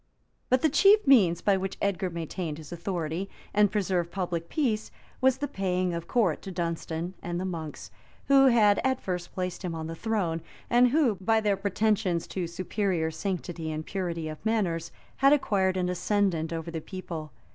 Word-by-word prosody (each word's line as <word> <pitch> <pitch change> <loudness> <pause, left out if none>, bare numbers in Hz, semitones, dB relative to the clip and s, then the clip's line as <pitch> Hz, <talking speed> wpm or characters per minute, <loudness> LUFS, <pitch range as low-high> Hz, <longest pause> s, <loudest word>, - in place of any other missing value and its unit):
But 255 +1 +3
the 315 - +5
chief 400 +8 +5
means 195 -12 +5
by 200 -2 +3
which 190 0 -4
Edgar 195 -2 0
maintained 165 -1 -4
his 155 0 -11
authority, 175 +1 -3 0.2
and 205 -1 +4
preserved 185 -5 0
public 170 -2 -3
peace, 230 -8 0 0.3
was 260 0 +4
the 290 +2 -2
paying 185 -4 -1
of 170 0 -4
court 200 -9 +1
to 195 - -7
Dunstan 170 0 -3
and 175 0 -3
the 185 - -2
monks, 160 -5 -6 0.4
who 275 -1 +6
had 215 -5 +5
at 260 0 +1
first 180 -2 -4
placed 180 -1 -3
him 175 -2 -3
on 160 -1 -4
the 165 - -5
throne, 175 -4 -1 0.3
and 245 +1 +6
who, 250 -6 +2
by 225 +4 +3
their 210 -2 +2
pretensions 200 -3 0
to 180 -3 -3
superior 180 -1 -1
sanctity 170 -2 -4
and 155 0 -4
purity 170 -4 -3
of 155 +2 -8
manners, 190 -7 0 0.3
had 275 +1 +6
acquired 190 -9 +2
an 180 -1 0
ascendant 180 -2 0
over 165 0 -4
the 165 -1 -4
people. 165 -5 -7
185 Hz, 180 wpm, -28 LUFS, 170-210 Hz, 0.4 s, who